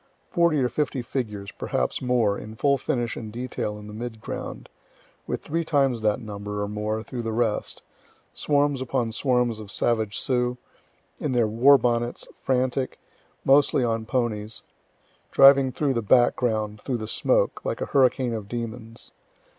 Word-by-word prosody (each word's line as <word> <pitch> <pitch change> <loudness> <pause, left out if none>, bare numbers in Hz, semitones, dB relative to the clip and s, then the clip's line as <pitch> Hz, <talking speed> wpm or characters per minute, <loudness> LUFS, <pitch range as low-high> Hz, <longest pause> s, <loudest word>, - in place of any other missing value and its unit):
Forty 170 -4 +3
or 130 -3 +2
fifty 130 0 -2
figures, 105 -6 -4
perhaps 65 - -2
more, 120 -5 +2
in 110 +1 -8
full 140 +3 +2
finish 120 -2 -1
and 110 -2 -7
detail 120 -3 -4
in 105 - -10
the 105 - -9
mid 110 0 -6
ground, - - -6 0.6
with - - -3
three 165 +2 -1
times 135 -7 +1
that 105 +1 +1
number, 105 -2 -5
or - - -2
more, 105 +1 -3
through 120 0 -5
the 115 -1 -3
rest 110 -1 -1 0.5
swarms 145 -2 +1
upon 125 -3 -1
swarms 125 -2 +1
of 105 -2 -9
savage 110 -2 0
Sioux, 125 -1 0 0.6
in 145 - -2
their 120 -2 +3
war 125 +6 +6
bonnets, 120 -1 -1
frantic, 130 0 0 0.5
mostly 135 -1 +4
on 115 -2 -1
ponies, 110 -4 -2 0.7
driving 135 -1 +7
through 140 +1 0
the 115 - 0
background, 110 -2 +2
through 130 -3 -2
the 110 -1 -5
smoke, - - +1
like - - -2
a - - -1
hurricane 130 -3 +2
of 110 -3 -5
demons. 115 0 -6
120 Hz, 155 wpm, -25 LUFS, 110-130 Hz, 0.7 s, driving